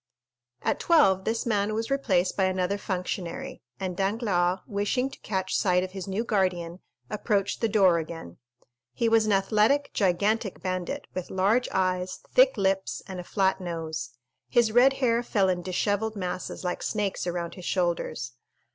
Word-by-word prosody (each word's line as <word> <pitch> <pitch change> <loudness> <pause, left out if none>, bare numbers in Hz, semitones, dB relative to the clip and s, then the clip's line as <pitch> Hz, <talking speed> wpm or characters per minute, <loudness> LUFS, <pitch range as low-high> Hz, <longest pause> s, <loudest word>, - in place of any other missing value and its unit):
At - - 0
twelve 195 - +4
this 225 +1 -1
man 210 -2 0
was 225 +3 -3
replaced 190 -10 +1
by 190 - +2
another 185 +1 0
functionary, 190 +7 -4 0.2
and 185 -2 -3
Danglars, 195 -2 +1
wishing 210 +6 -1
to - - -12
catch 190 -2 -2
sight 180 -1 +2
of 185 - -5
his 190 0 -6
new 195 +4 -1
guardian, 185 -5 -1 0.3
approached 205 -2 0
the 230 - +2
door 190 -5 +4
again. 160 - -7 0.6
He 235 - 0
was 225 -1 +4
an - - +2
athletic, 215 +8 +2
gigantic 200 +2 +1
bandit, 185 -2 -3
with 185 -1 -5
large 205 +7 +2
eyes, 185 -1 -1
thick - - +5
lips, 195 0 0
and 190 -2 -6
a - - -5
flat 190 0 +1
nose; 160 -7 -4 0.4
his 235 -3 +3
red 250 +4 +6
hair 240 -3 +1
fell 200 -5 +1
in 180 -1 0
dishevelled 205 +4 -1
masses 185 -1 -4
like 180 -1 -2
snakes 205 -4 -2
around 175 -1 -3
his 180 - -10
shoulders. 170 -9 -1
195 Hz, 160 wpm, -27 LUFS, 180-220 Hz, 0.6 s, red